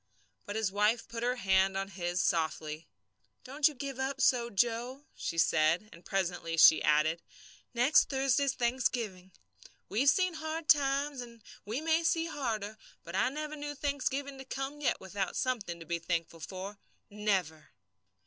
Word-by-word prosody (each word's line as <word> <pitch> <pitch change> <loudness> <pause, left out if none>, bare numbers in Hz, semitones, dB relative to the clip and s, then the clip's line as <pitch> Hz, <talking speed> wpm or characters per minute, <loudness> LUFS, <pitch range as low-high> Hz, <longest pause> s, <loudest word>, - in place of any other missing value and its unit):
But 205 - -4
his 220 -3 0
wife 210 +3 +1
put 230 0 -6
her 245 +1 +1
hand 190 -3 +2
on 195 0 -3
his 175 -1 -2
softly. 160 -1 -1 0.6
"Don't 280 +3 +2
you 305 - -4
give 275 0 -5
up 265 0 -2
so, 240 -2 +3
Joe," 240 +6 -1
she 165 - -4
said. 165 +5 +3
And 170 - -15
presently 175 -3 -2
she 160 - +8
added: 155 +2 +2 0.5
"Next 250 +6 +4
Thursday's 270 0 +1
Thanksgiving. 235 -6 -1 0.6
We've 250 +8 +3
seen 365 +2 +2
hard 315 0 -5
times, 280 -1 +3
and 235 -2 -12 0.2
we 225 +8 -3
may 325 +1 +2
see 330 0 +2
harder, 220 -9 -3 0.2
but - - -7
I - - +3
never 305 +2 -5
knew 290 0 -5
Thanksgiving 280 -1 -2
to - - -7
come 270 +2 -5
yet 285 - +1
without 190 +1 -4
something 220 -10 -2
to 165 - -10
be 170 +1 -2
thankful 165 0 -3
for 190 +4 -7 0.3
never." 190 -7 -1
230 Hz, 160 wpm, -31 LUFS, 190-275 Hz, 0.6 s, she